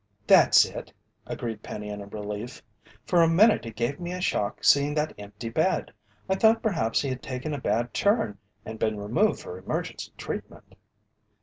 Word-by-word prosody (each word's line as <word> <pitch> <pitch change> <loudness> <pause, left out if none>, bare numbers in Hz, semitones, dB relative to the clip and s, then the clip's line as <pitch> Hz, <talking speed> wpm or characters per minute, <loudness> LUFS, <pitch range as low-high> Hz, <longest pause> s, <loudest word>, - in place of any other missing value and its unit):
"That's - - +7
it," - - -8 0.4
agreed 115 -3 -5
Penny 105 -1 -7
in 105 0 -6
relief. 105 +3 -6 0.4
"For 175 -2 +3
a 165 - +6
minute 195 - +4
it 115 - -8
gave 120 +5 -2
me 175 0 -4
a 180 - -4
shock 105 - -1
seeing 145 +1 +4
that 150 0 0
empty 105 +3 -7
bed. 160 +10 0 0.4
I 190 - +2
thought 220 +3 +4
perhaps 160 - +1
he 140 - -2
had 130 -1 -4
taken 130 +3 -4
a 145 - -4
bad 120 0 0
turn 200 - +1 0.3
and 110 0 -7
been 110 -1 0
removed 115 - +1
for 90 - -8
emergency - - -4
treatment." - - -7
125 Hz, 175 wpm, -26 LUFS, 105-170 Hz, 0.4 s, That's